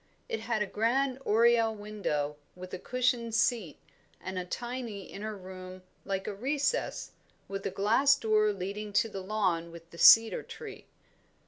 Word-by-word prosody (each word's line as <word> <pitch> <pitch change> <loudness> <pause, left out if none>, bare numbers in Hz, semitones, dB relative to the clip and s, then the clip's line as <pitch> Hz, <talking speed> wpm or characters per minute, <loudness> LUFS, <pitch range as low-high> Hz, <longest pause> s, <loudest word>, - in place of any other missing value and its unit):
It 455 -2 -3
had 220 -3 -1
a - - -3
grand 250 +6 0
oriel 230 0 +4
window, 200 -9 -3 0.2
with 180 0 -10
a 185 - -4
cushioned 245 -1 0
seat, 225 - +1 0.4
and 185 0 -5
a 180 - -4
tiny 235 0 -5
inner 210 +3 -6
room 185 0 -10 0.2
like 195 0 -2
a 210 - -3
recess, 285 - -1 0.4
with 195 0 -4
a - - -1
glass 245 +8 +3
door 215 -4 +2
leading 200 +2 -5
to 225 - +2
the 195 -2 -6
lawn 185 -4 -1
with 165 0 -13
the 170 - -12
cedar 225 0 +8
tree. - - -10
210 Hz, 155 wpm, -30 LUFS, 185-235 Hz, 0.4 s, cedar